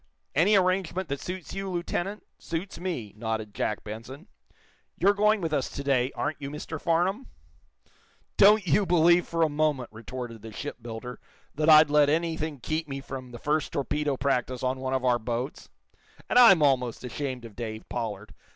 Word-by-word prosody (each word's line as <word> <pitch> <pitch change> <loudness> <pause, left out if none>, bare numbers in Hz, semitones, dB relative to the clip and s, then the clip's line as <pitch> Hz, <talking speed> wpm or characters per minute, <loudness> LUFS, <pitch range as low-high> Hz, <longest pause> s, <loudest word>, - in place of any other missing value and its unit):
"Any 185 +9 +4
arrangement 185 -1 +1
that 140 0 -2
suits 180 -1 -6
you, 195 0 -4
Lieutenant, 180 +3 -3
suits 170 +4 -5
me," 165 - -4
nodded 110 -1 -4
Jack 105 - -2
Benson. 115 - -8 0.7
"You're 200 - +4
going 210 +1 +3
with 165 -2 -2
us 140 -3 0
to 140 - -6
day, 135 -2 +1
aren't 150 - -3
you, 140 - -4
Mr. 150 +1 -6
Farnum?" 180 +9 0 1.1
"Don't 205 0 +6
you 190 +4 +2
believe, 175 0 +4
for 165 0 +1
a - - +4
moment," 145 -4 0
retorted 115 +1 -7
the 110 +1 -9
shipbuilder, 120 -1 -7 0.3
"that 155 +2 +1
I'd 155 -1 +8
let 150 -1 +5
anything 160 -2 -1
keep 155 +5 -2
me 135 -1 -5
from 130 -2 -8
the 120 - -9
first 150 +4 -1
torpedo 145 0 -1
practice 130 -2 -1
on 130 +1 0
one 130 0 -2
of 130 -1 -1
our 120 -1 +3
boats. 120 +4 -4 0.6
And 245 - +4
I'm 195 -10 +8
almost 125 -5 +1
ashamed 130 -1 -4
of 110 -3 -11
Dave 110 0 -6
Pollard. 110 -4 -5
145 Hz, 170 wpm, -27 LUFS, 125-170 Hz, 1.1 s, I'd